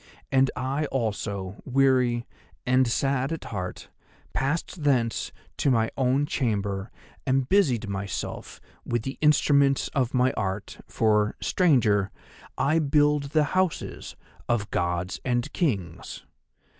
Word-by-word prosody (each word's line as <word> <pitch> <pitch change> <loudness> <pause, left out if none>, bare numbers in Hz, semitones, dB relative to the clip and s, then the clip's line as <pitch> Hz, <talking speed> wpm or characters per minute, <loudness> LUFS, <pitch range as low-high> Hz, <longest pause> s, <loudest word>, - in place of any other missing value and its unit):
And 135 0 +4
I 135 +4 -1
also, 105 -6 -3
weary 130 -3 +2 0.4
and 130 +1 +3
sad 135 +3 0
at 165 - -4
heart, 90 -4 -6 0.4
passed 150 +5 -2
thence 125 -5 +1 0.3
to - - +2
my 115 -3 +2
own 135 +2 +2
chamber 100 -7 -1 0.3
and 130 -1 +1
busied 135 - +2
myself 100 -1 -5 0.2
with 120 -2 -1
the 135 +2 -5
instruments 140 -2 +4
of 130 -3 -1
my 125 +1 +3
art, 100 -1 -4
for, 105 -1 +2
stranger, 110 - +3 0.5
I 155 +4 +2
build 150 -1 +3
the 150 +2 +2
houses 185 -2 -1 0.3
of 110 -4 0
gods 90 +1 -1
and 125 +3 -1
kings. 100 - -2
125 Hz, 120 wpm, -26 LUFS, 105-140 Hz, 0.5 s, And